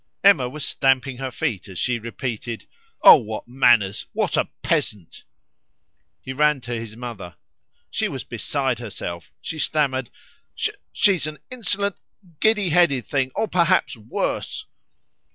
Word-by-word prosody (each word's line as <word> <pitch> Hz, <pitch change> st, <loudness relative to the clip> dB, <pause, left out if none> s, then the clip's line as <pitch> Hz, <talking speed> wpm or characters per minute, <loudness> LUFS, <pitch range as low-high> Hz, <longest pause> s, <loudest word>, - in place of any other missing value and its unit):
Emma 170 Hz, -11 st, +6 dB
was 150 Hz, +2 st, -5 dB
stamping 135 Hz, -1 st, +1 dB
her 135 Hz, 0 st, -3 dB
feet 125 Hz, -, -3 dB
as 95 Hz, -2 st, -9 dB
she 120 Hz, +6 st, 0 dB
repeated 115 Hz, 0 st, -5 dB, 0.4 s
"Oh! -, -, +11 dB
what 110 Hz, +1 st, -6 dB
manners! 120 Hz, -6 st, +3 dB
What -, -, 0 dB
a -, -, +1 dB
peasant!" 95 Hz, -6 st, -1 dB, 1.0 s
He 130 Hz, -, -5 dB
ran 150 Hz, +1 st, +3 dB
to 120 Hz, 0 st, -5 dB
his 115 Hz, -2 st, -5 dB
mother; 115 Hz, -8 st, -7 dB, 0.6 s
she -, -, 0 dB
was -, -, -5 dB
beside 135 Hz, -4 st, -1 dB
herself. 85 Hz, -8 st, -6 dB
She 160 Hz, -, -5 dB
stammered 135 Hz, -6 st, 0 dB, 0.5 s
"She 200 Hz, -, +1 dB
is 165 Hz, -4 st, -2 dB
an 155 Hz, 0 st, -6 dB
insolent, 205 Hz, -5 st, -1 dB, 0.4 s
giddy 210 Hz, -4 st, +3 dB
headed 155 Hz, -7 st, +3 dB
thing, 135 Hz, -2 st, 0 dB
or 220 Hz, -, 0 dB
perhaps 170 Hz, -6 st, +2 dB
worse!" 110 Hz, 0 st, -3 dB
130 Hz, 135 wpm, -23 LUFS, 115-150 Hz, 1.0 s, Oh